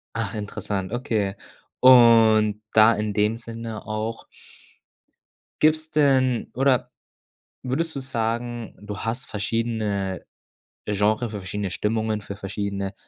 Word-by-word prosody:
Ach 115 Hz, -2 st, -2 dB
interessant, 105 Hz, -2 st, -4 dB
okay. 110 Hz, -5 st, -1 dB, 0.4 s
Und 115 Hz, -4 st, +6 dB
da 110 Hz, +1 st, +7 dB
in 105 Hz, 0 st, -2 dB
dem 105 Hz, +2 st, +1 dB
Sinne 115 Hz, -1 st, -7 dB
auch 110 Hz, +1 st, -4 dB, 1.4 s
gibt's 155 Hz, +1 st, +2 dB
denn 130 Hz, -5 st, +2 dB
oder 130 Hz, -1 st, +2 dB, 0.7 s
würdest 160 Hz, +6 st, -2 dB
du -, -, -2 dB
sagen, 120 Hz, -2 st, -3 dB
du 105 Hz, 0 st, -7 dB
hast 115 Hz, +4 st, -3 dB
verschiedene 105 Hz, -3 st, -2 dB, 0.6 s
Genre, 105 Hz, +3 st, +1 dB
für 105 Hz, -, -6 dB
verschiedene 100 Hz, 0 st, -4 dB
Stimmungen, 110 Hz, +2 st, -1 dB
für 100 Hz, 0 st, -7 dB
verschiedene 100 Hz, 0 st, -4 dB
110 Hz, 110 wpm, -24 LUFS, 105-120 Hz, 1.4 s, da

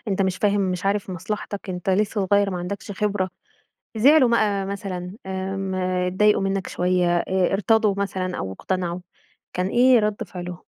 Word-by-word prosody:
أنت 195 Hz, -1 st, +1 dB
مش 190 Hz, -1 st, 0 dB
فاهم، 205 Hz, -1 st, +2 dB
مش 185 Hz, 0 st, -1 dB
عارف 200 Hz, -1 st, 0 dB
مصلحتك. 200 Hz, +2 st, -5 dB
أنت 180 Hz, +1 st, -2 dB
لسّه 205 Hz, +1 st, +1 dB
صغيّر 200 Hz, 0 st, +4 dB
ما 180 Hz, -, -3 dB
عندكش 200 Hz, +3 st, -5 dB
خبرة، 195 Hz, -2 st, -1 dB, 0.7 s
زعلوا 270 Hz, +3 st, +6 dB
مَقى 205 Hz, -4 st, +2 dB
مثلًا 190 Hz, -2 st, -5 dB
آمم، 190 Hz, 0 st, -3 dB
اتضايقوا 185 Hz, +3 st, +2 dB
منّك 195 Hz, -1 st, -1 dB
شويّة، 180 Hz, -1 st, +1 dB
آآ 185 Hz, +1 st, +1 dB
ارتضوا 210 Hz, +1 st, +3 dB
مثلًا 185 Hz, -2 st, -2 dB
أو 95 Hz, -, -4 dB
اقتنعوا، 180 Hz, -, -3 dB, 0.5 s
كان 180 Hz, +1 st, -1 dB
إيه 245 Hz, +2 st, +5 dB
رد 210 Hz, -1 st, -1 dB
فعلهم؟ 180 Hz, -1 st, -7 dB
195 Hz, 155 wpm, -23 LUFS, 185-205 Hz, 0.7 s, زعلوا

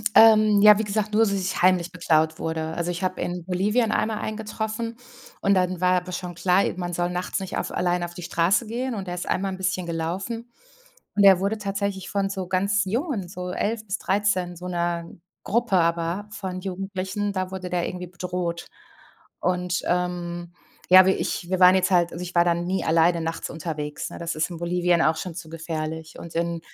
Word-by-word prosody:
Ähm 215 Hz, -2 st, +7 dB
Ja, 210 Hz, 0 st, +9 dB
wie -, -, +1 dB
gesagt, 210 Hz, 0 st, -2 dB
nur 220 Hz, +2 st, +5 dB
dass 210 Hz, -, +1 dB
ich 190 Hz, -1 st, -2 dB
heimlich 180 Hz, -1 st, +3 dB
beklaut 160 Hz, -3 st, +1 dB
wurde. 160 Hz, 0 st, -3 dB
Also, 170 Hz, 0 st, -1 dB
ich 175 Hz, +1 st, -5 dB
habe 185 Hz, 0 st, -1 dB
in 175 Hz, 0 st, -3 dB
Bolivien 210 Hz, +6 st, +1 dB
einmal 220 Hz, 0 st, 0 dB
einen 215 Hz, -, -4 dB
getroffen. 220 Hz, +1 st, -4 dB, 0.4 s
Und 200 Hz, -, +3 dB
dann 180 Hz, -1 st, 0 dB
war 180 Hz, 0 st, +4 dB
aber 180 Hz, +1 st, -9 dB
schon 175 Hz, -1 st, -5 dB
klar, 180 Hz, +3 st, +3 dB
e -, -, -1 dB
man 175 Hz, -1 st, -4 dB
soll 175 Hz, +1 st, 0 dB
nachts 180 Hz, +2 st, -2 dB
nicht 190 Hz, -1 st, -4 dB
auf -, -, -3 dB
alleine 175 Hz, 0 st, 0 dB
auf 175 Hz, -, -9 dB
die 180 Hz, -, -9 dB
Straße 180 Hz, +7 st, +2 dB
gehen. 245 Hz, +2 st, -3 dB
Und 195 Hz, -2 st, -5 dB
der 175 Hz, -, -3 dB
ist 180 Hz, -, -5 dB
einmal 195 Hz, +1 st, 0 dB
'n 190 Hz, -, -5 dB
bisschen 185 Hz, -1 st, -1 dB
gelaufen. 190 Hz, +8 st, -4 dB, 0.7 s
Und 205 Hz, -, +4 dB
der 195 Hz, -2 st, +8 dB
wurde 200 Hz, +3 st, 0 dB
tatsächlich 200 Hz, -2 st, -3 dB
von 200 Hz, -1 st, 0 dB
so 190 Hz, -2 st, -4 dB
ganz 200 Hz, +3 st, +2 dB
jungen, 225 Hz, -, -2 dB
so 180 Hz, 0 st, -6 dB
11 215 Hz, +4 st, -2 dB
bis 195 Hz, 0 st, -2 dB
13, 190 Hz, -3 st, 0 dB
so 180 Hz, +2 st, -8 dB
'ner 170 Hz, -1 st, -1 dB, 0.4 s
Gruppe, 230 Hz, -2 st, +1 dB
aber 170 Hz, +3 st, +1 dB
von 190 Hz, -3 st, -5 dB
Jugendlichen, 195 Hz, +1 st, -3 dB
da 185 Hz, -1 st, -2 dB
wurde 185 Hz, -1 st, -6 dB
der 175 Hz, -1 st, 0 dB
irgendwie 180 Hz, 0 st, -5 dB
bedroht. 175 Hz, -1 st, -4 dB, 0.7 s
Und, 180 Hz, -1 st, 0 dB
ähm, 175 Hz, -1 st, -2 dB, 0.4 s
ja, 185 Hz, 0 st, +9 dB
wir 190 Hz, -, +3 dB
ich 175 Hz, -, -3 dB
wir 185 Hz, -1 st, 0 dB
waren 180 Hz, 0 st, +8 dB
jetzt 185 Hz, -1 st, +2 dB
halt 175 Hz, -2 st, +3 dB
also, 170 Hz, -, -6 dB
ich 180 Hz, 0 st, -7 dB
war 170 Hz, 0 st, +5 dB
da 175 Hz, -, +3 dB
nie 175 Hz, +3 st, -2 dB
alleine 165 Hz, +1 st, +3 dB
nachts 165 Hz, 0 st, -3 dB
unterwegs, 150 Hz, -2 st, -5 dB
ne? -, -, -8 dB
Das 170 Hz, 0 st, -3 dB
ist 155 Hz, +3 st, 0 dB
in 170 Hz, -, -6 dB
Bolivien 175 Hz, 0 st, +1 dB
auch 160 Hz, +1 st, +3 dB
schon 180 Hz, -1 st, -5 dB
zu 165 Hz, -1 st, -8 dB
gefährlich. 160 Hz, -1 st, -5 dB
Und 170 Hz, -, -9 dB
in 170 Hz, 0 st, -1 dB
180 Hz, 210 wpm, -24 LUFS, 175-200 Hz, 0.7 s, Ja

